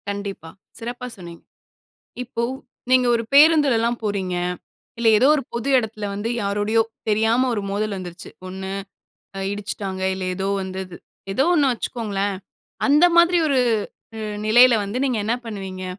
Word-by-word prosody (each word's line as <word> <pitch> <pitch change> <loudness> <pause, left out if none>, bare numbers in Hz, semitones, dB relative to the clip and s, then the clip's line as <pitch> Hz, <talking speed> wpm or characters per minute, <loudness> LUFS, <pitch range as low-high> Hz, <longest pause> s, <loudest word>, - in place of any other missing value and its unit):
கண்டிப்பா, 200 -5 -5 0.3
சிறப்பா 245 +2 -6
சொன்னீங்க. 170 -2 -11 0.8
இப்போ, 235 -1 -4 0.5
நீங்க 255 -1 +5
ஒரு 230 - -1
பேருந்துலலாம் 280 -6 +5
போறீங்க 190 -3 -2 0.6
இல்லை 230 -1 +4
ஏதோ 260 - +5
ஒரு 290 - -2
பொது 235 +3 -2
இடத்துல 220 -3 -3
வந்து, 205 +3 -3
யாரோடையோ, 205 +2 +1 0.3
தெரியாம 225 +4 +2
ஒரு 210 - -2
மோதல் 205 0 -2
வந்துருச்சு. 180 -2 -8 0.2
ஒண்ணு 190 +1 -6 0.7
அ - - -4
இடிச்சுட்டாங்க, 195 -2 -5
இல்ல 190 0 -5
ஏதோ 190 +1 -2
வந்தது. 190 -1 -6 0.4
ஏதோ 265 +7 +2
ஒண்ணு 285 -5 +3
வச்சுக்கோங்களேன். 205 -4 -3 0.5
அந்த 295 +4 +5
மாதிரி 345 +1 +5
ஒரு 275 -2 +2 0.6
உ - - -6 0.3
நிலையில 240 +3 +7
வந்து 200 +5 -3
நீங்க 255 -4 0
என்ன 225 +3 +1
பண்ணுவீங்க? 190 -4 -6
215 Hz, 140 wpm, -22 LUFS, 195-245 Hz, 0.8 s, நிலையில